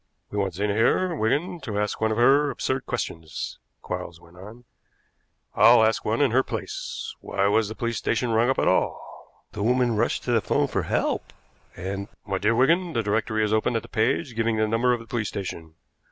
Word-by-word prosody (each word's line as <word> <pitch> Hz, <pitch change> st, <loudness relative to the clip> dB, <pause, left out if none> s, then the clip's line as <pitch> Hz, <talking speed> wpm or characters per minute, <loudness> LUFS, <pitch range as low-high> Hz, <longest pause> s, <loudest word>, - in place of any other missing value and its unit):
"We 105 Hz, -, -2 dB
want 95 Hz, -3 st, -1 dB
Zena 100 Hz, +2 st, 0 dB
here, 170 Hz, -, +2 dB
Wigan, 155 Hz, +7 st, 0 dB
to 105 Hz, -3 st, -4 dB
ask 105 Hz, +1 st, -2 dB
one 110 Hz, 0 st, +2 dB
of 110 Hz, -, -1 dB
her 140 Hz, +5 st, +5 dB
absurd 130 Hz, -1 st, -2 dB
questions," 80 Hz, -1 st, -4 dB, 0.2 s
Quarles 85 Hz, -1 st, -5 dB
went 85 Hz, 0 st, -19 dB
on. 105 Hz, +7 st, -12 dB, 0.9 s
"I'll 115 Hz, -1 st, +7 dB
ask 110 Hz, 0 st, +1 dB
one 115 Hz, +5 st, 0 dB
in 140 Hz, -5 st, +3 dB
her 130 Hz, +3 st, +4 dB
place. -, -, -5 dB
Why 100 Hz, -, -1 dB
was 105 Hz, +2 st, +3 dB
the 110 Hz, -, -6 dB
police 115 Hz, -1 st, -2 dB
station 115 Hz, +1 st, 0 dB
rung 115 Hz, +2 st, +3 dB
up 135 Hz, -, +1 dB
at -, -, +1 dB
all?" -, -, -2 dB
"The 105 Hz, -, -6 dB
woman 120 Hz, +1 st, +2 dB
rushed 115 Hz, +3 st, 0 dB
to 125 Hz, -, -2 dB
the 115 Hz, -2 st, +3 dB
'phone -, -, +1 dB
for -, -, -1 dB
help, -, -, -1 dB, 0.4 s
and 100 Hz, +2 st, -5 dB
" -, -, -47 dB
"My 95 Hz, -2 st, -2 dB
dear 110 Hz, +3 st, +2 dB
Wigan, 165 Hz, +8 st, +3 dB
the 115 Hz, -, 0 dB
directory 110 Hz, +1 st, 0 dB
is 105 Hz, -, -1 dB
open 110 Hz, +2 st, +1 dB
at 115 Hz, -, -1 dB
the -, -, -11 dB
page 125 Hz, +3 st, 0 dB
giving 115 Hz, 0 st, 0 dB
the 110 Hz, 0 st, +2 dB
number 115 Hz, +3 st, +2 dB
of 120 Hz, -1 st, 0 dB
the -, -, -12 dB
police 115 Hz, -2 st, -2 dB
station. 80 Hz, -4 st, -6 dB
110 Hz, 210 wpm, -25 LUFS, 105-125 Hz, 0.9 s, I'll